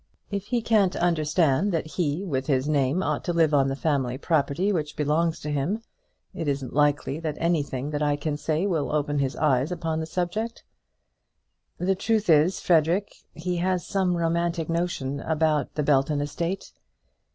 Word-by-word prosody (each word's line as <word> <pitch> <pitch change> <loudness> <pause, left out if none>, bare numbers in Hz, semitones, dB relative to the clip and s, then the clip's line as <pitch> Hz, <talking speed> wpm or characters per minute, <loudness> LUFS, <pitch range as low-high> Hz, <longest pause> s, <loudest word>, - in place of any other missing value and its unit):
If 200 0 -3
he 240 -1 0
can't 205 -5 +3
understand 165 +1 +2
that 165 - 0
he, 155 +3 -2
with 135 -6 -2
his 135 -1 +1
name, 145 +4 +1
ought - - -1
to 175 - 0
live 165 -2 +3
on 135 -2 +4
the 135 - -1
family 135 -4 0
property 155 +5 +1
which 150 -4 -2
belongs 160 +3 +1
to 150 - -4
him, 165 +11 -1 0.5
it 165 - -4
isn't 140 -3 -2
likely 145 0 +1
that 155 -3 -3
anything 150 -5 -1
that 150 0 -2
I 145 -1 +2
can 145 +1 -2
say 155 +4 -1
will 165 -7 0
open 145 -1 0
his 135 -1 -1
eyes 145 0 +1
upon 165 -2 -2
the 160 - -3
subject." 185 +7 -3 1.1
"The 185 +2 +1
truth 210 0 +1
is, 160 +5 +4
Frederic, 175 +4 +2 0.2
he 175 +2 -2
has 180 0 0
some 185 -3 0
romantic 170 0 0
notion 165 -5 -1
about 155 -1 0
the 150 - 0
Belton 145 +1 +2
estate." 170 +6 -3
160 Hz, 170 wpm, -25 LUFS, 145-175 Hz, 1.1 s, on